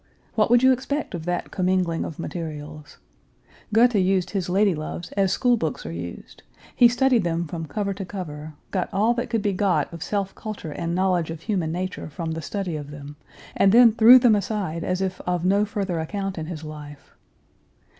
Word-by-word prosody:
What 215 -1 +2
would 240 +1 +5
you 260 - +7
expect 265 +2 -2
of 165 -3 -5
that 175 0 -2
commingling 180 -2 0
of 160 - -7
materials? 155 -3 -7 0.7
Goethe 240 +3 +5
used 185 -2 +1
his 190 -3 -2
lady 195 +1 +3
loves 155 +2 -6
as 195 -2 +1
school 245 +4 +2
books 160 - -3
are 80 - -5
used: 85 +1 -8 0.3
he 245 - +7
studied 245 -2 +2
them 170 0 -1
from 165 0 -6
cover 200 +5 -2
to 195 +1 -6
cover, 155 -5 -7 0.2
got 185 -2 -1
all 215 +5 +2
that 240 0 -3
could 225 -3 -1
be 205 -2 +1
got 185 -3 0
of 165 - -8
self 200 0 -2
culture 210 -7 -7
and 170 +2 -3
knowledge 180 -3 +1
of 165 -1 -6
human 180 -6 -1
nature 185 -1 -4
from 165 +1 -5
the 165 0 -4
study 185 +1 -4
of 145 -2 -6
them, 145 0 -9 0.4
and 195 - +4
then 235 +1 +7
threw 230 +3 +8
them 240 -3 +5
aside 200 -5 -2
as 185 +1 -1
if 190 -1 -2
of 180 -1 0
no 200 +3 +3
further 195 -5 -3
account 195 +2 -4
in 155 - -5
his 160 -3 -6
life. 150 -2 -10
185 Hz, 195 wpm, -24 LUFS, 160-205 Hz, 0.7 s, threw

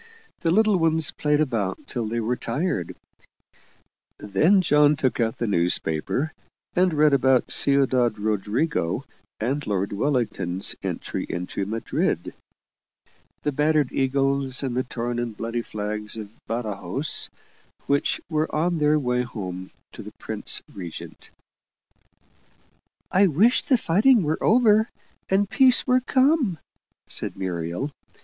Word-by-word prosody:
The 165 - 0
little 215 +2 +4
ones 160 -2 +2
played 150 0 0
about 115 -10 -1
till 120 -4 -3
they 115 +2 -2
were 115 +2 0
tired; 120 - -2 1.2
then 150 - +3
John 150 -2 +4
took 130 -3 -1
out 115 -1 0
the 120 - -1
newspaper, 90 - 0 0.4
and 180 0 +3
read 150 -1 +3
about 130 -2 +3
Ciudad 130 -5 +2
Rodrigo 105 - -1 0.3
and 135 +6 -2
Lord 100 -1 -1
Wellington's 105 -7 0
entry - - -4
into 90 +2 -3
Madrid 115 +2 -2 1.1
the 150 - 0
battered 150 -1 +1
eagles 135 0 0
and 130 -3 -2
the 130 - +2
torn 120 -1 -4
and 115 -3 -4
bloody 115 +1 -3
flags 105 0 -4
of 105 -2 -7 0.2
Badajoz, 115 +5 -2 0.6
which 140 0 +1
were 155 0 0
on 170 +2 +1
their 150 0 +3
way 125 -3 0
home 95 -7 -6 0.2
to - - -10
the - - -10
Prince - - -2
Regent. 90 -4 -9 1.8
"I 195 +2 +5
wish 200 - +3
the 260 - +3
fighting 220 +5 +4
were 155 +1 -1
over, 220 -1 +4 0.4
and 195 +1 +2
peace 255 +4 +4
were 255 0 +3
come," 260 - +2 0.5
said - - -4
Muriel. 90 - -3
135 Hz, 125 wpm, -24 LUFS, 110-160 Hz, 1.8 s, I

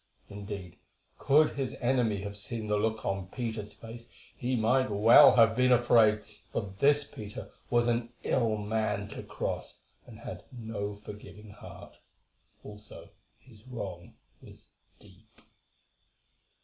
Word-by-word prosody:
Indeed, 100 -3 -8 0.4
could 150 +3 +4
his 135 -2 -3
enemy 120 -5 +1
have 100 0 -6
seen 110 +2 -6
the 105 0 0
look 110 +1 -1
on 95 -1 -2
Peter's 110 -1 -5
face 115 +1 -11 0.3
he 125 +1 -1
might 125 +3 +2
well 115 +7 +7
have 115 -2 +5
been 125 +1 +3
afraid, 115 -3 +4 0.3
for 100 -3 -3
this 145 +1 +4
Peter 110 -4 -9 0.2
was 120 0 +2
an 120 0 0
ill 115 -4 +1
man 105 -1 -2
to - - -7
cross, - - -5 0.3
and - - -12
had - - -7
no 110 -4 -5
forgiving 105 0 -11
heart; 105 - -13 0.6
also, 105 0 -11 0.3
his 115 -5 -19
wrong 100 -8 -7 0.3
was - - -14 0.3
deep. 105 +2 -21
110 Hz, 130 wpm, -30 LUFS, 105-120 Hz, 0.6 s, well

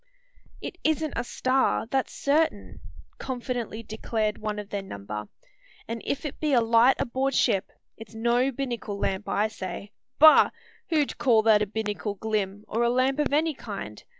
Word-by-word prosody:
"It 355 - -7
isn't 315 -1 0
a - - -1
star, 255 +1 +1
that's 265 +3 -1
certain," 315 +3 0 0.4
confidently 245 -3 -4
declared 220 -1 -2
one 210 -1 -3
of 205 -1 -6
their 200 - -2
number; 105 - -6 0.6
"and 230 0 -4
if 280 +2 -3
it 295 - -5
be 305 -2 0
a 250 - +6
light 230 +3 +5
aboard 265 +2 -1
ship, 195 -1 +2 0.3
it's 225 0 -12
no 240 +4 +2
binnacle 240 -6 -4
lamp, 195 0 -2
I 210 +2 +2
say. 200 -1 -7 0.3
Bah! 310 +1 +8 0.4
who'd 305 -4 0
call 225 -4 +4
that 215 -1 +5
a 210 - +1
binnacle 210 0 -3
glim, 205 -1 -2
or 225 - -1
a 235 - +3
lamp 260 +3 +1
of 295 - +1
any 310 +2 +2
kind? 195 - -7
230 Hz, 165 wpm, -26 LUFS, 210-270 Hz, 0.6 s, Bah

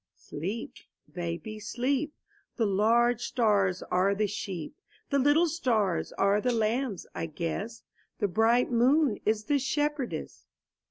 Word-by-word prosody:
Sleep, 195 +10 -6 0.4
baby, 175 +5 -5
sleep! 260 +8 -1 0.2
' - - -38
The 230 - +2
large 230 +4 +3
stars 205 -6 +1
are 190 +2 +3
the 210 +1 +1
sheep; 190 - -5 0.4
The 280 - +3
little 290 +5 +4
stars 230 - 0
are 200 +1 +2
the 250 - +1
lambs, 225 -1 -1
I 165 - -3
guess; 175 +8 -4 0.3
The 205 - +1
bright 225 +7 +2
moon 255 +1 +3
is 215 0 +2
the 285 +4 +1
shepherdess. 295 -1 -2
225 Hz, 130 wpm, -28 LUFS, 200-255 Hz, 0.4 s, little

